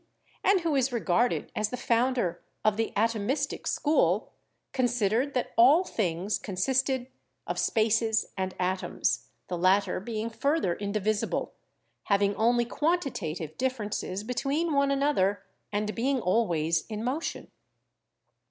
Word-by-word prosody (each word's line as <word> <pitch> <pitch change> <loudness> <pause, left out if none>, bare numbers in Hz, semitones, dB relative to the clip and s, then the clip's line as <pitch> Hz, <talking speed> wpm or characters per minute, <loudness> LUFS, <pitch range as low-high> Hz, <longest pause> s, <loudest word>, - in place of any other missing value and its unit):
and 390 -2 +4
who 330 -2 0
is 265 -1 +2
regarded 235 0 +1
as 215 0 0
the 250 - -4
founder 235 -8 +1 0.2
of 215 -1 +4
the 225 +1 -1
Atomistic 230 +6 0
school, 305 +1 +1 0.4
consid 245 -6 +1
ered 260 +6 +1
that 250 - -1
all 275 +10 +6
things 190 - -1
consisted 255 +7 0 0.4
of - - -3
spaces 220 0 +1
and 190 -1 -3
atoms, 185 +1 -1 0.2
the 180 - -3
latter 190 +3 +3
being 220 +2 -4
further 275 - +1
indivisible, 205 +2 -1 0.5
having 200 0 +2
only 240 +2 +3
quantitative 230 - -2
differences 210 -6 -2
between 280 +7 -1
one 280 0 +3
another 275 -9 +1 0.3
and 210 +1 -1
being 260 +3 0
always 170 -6 +1
in 215 -1 -5
motion. 275 +7 -3
225 Hz, 125 wpm, -28 LUFS, 200-265 Hz, 0.5 s, all